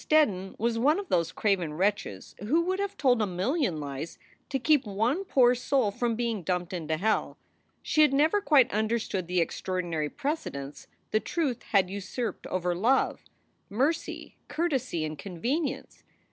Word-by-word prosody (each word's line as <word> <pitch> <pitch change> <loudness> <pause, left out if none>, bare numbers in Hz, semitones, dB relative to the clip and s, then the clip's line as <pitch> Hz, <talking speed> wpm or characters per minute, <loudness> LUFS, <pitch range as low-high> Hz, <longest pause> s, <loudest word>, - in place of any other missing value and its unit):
Steddon 200 -12 +2
was 230 +1 0
one 295 +7 +4
of 400 -2 -5
those 170 -2 +1
craven 180 -7 0
wretches 190 - -1
who 280 - +2
would 375 +2 -1
have 400 0 -3
told 250 -5 +3
a 210 - +1
million 190 - 0
lies 145 +2 -6 0.3
to 270 - 0
keep 290 +1 +3
one 225 - 0
poor 250 -9 +4
soul 250 -3 +1
from 235 +2 -1
being 230 -3 -1
dumped 180 0 -2
into 160 -3 -2
hell. 215 +5 0 0.5
She 310 - +2
had 300 - +6
never 310 +9 +3
quite 270 - +4
understood 215 -4 -1
the 180 0 +1
extraordinary 170 -3 -2
precedence 145 - -4 0.2
the 215 - +3
truth 280 -2 -2
had 190 -3 +2
usurped 205 +5 -4
over 180 -1 -1
love, 230 +10 +1 0.4
mercy, 270 +10 -1
courtesy, 265 - -1
and 155 -1 -6
convenience. 260 - -3
220 Hz, 155 wpm, -28 LUFS, 180-275 Hz, 0.5 s, had